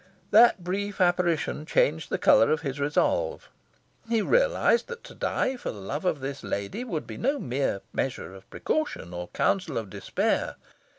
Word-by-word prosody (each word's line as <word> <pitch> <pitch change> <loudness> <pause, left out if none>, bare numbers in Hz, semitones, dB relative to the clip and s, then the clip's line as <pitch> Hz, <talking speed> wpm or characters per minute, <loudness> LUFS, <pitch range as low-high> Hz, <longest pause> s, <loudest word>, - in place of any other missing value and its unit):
That 220 -3 +6
brief 200 +3 -3
apparition 175 -4 +1
changed 155 0 +1
the - - 0
colour 115 - +5
of 155 -2 +1
his 140 -2 -4
resolve. 475 - 0 0.6
He 225 -2 +2
realised - - +3
that 475 -1 -8
to - - -11
die 260 0 -1
for - - -5
love 110 - -5
of 155 -6 0
this 140 +1 -5
lady 100 - -3
would 175 -11 -4
be - - -8
no 275 +4 0
mere 130 - -1
measure 125 -7 -3
of 95 0 -14
precaution, 305 - -2
or 90 0 -5
counsel 180 - 0
of 110 -4 -4
despair. - - -1
165 Hz, 165 wpm, -27 LUFS, -, 0.6 s, That